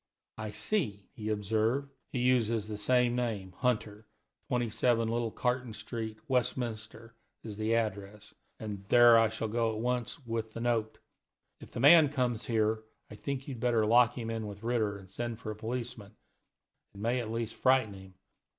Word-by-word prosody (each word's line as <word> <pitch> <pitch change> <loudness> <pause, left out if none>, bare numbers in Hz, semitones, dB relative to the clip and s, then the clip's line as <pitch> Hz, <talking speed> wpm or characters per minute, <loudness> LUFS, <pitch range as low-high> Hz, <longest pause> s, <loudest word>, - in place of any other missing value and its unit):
"I 110 0 -4
see," 105 - -2
he 110 -5 -5
observed, 110 +6 0 0.2
"he - - -3
uses 115 -4 +2
the 110 - -4
same 120 +3 +2
name, 110 -6 -2
Hunter; 110 -4 -1 0.4
27 120 -1 +1
Little 115 0 0
Carton 125 0 -1
Street, 110 0 -5
Westminster, 115 -3 -2 0.3
is 110 -2 -7
the 110 +2 0
address, 105 -2 -3 0.3
and 105 -3 -6
there 120 -1 +8
I 115 -1 +4
shall 110 +1 -3
go 115 +1 0
at - - -4
once 125 +2 -2
with 115 -1 -3
the - - -6
note. 115 -2 0 0.6
If - - -12
the - - -5
man 150 +3 +8
comes 125 -5 -1
here, 110 -1 +1 0.3
I - - -8
think 135 +4 -4
you 140 - -4
had 115 - -9
better 115 -3 +2
lock 120 +2 +4
him 115 -2 -3
in 110 -1 -3
with 100 +1 -9
Ritter, 110 -4 0
and 95 -1 -13
send 120 +3 -4
for 110 -2 -6
a - - -6
policeman 115 -2 -5 0.8
it - - -10
may 120 +4 0
at 115 -3 -4
least 115 0 -3
frighten 130 -5 +3
him. 95 -1 -13
115 Hz, 175 wpm, -31 LUFS, 110-125 Hz, 0.8 s, there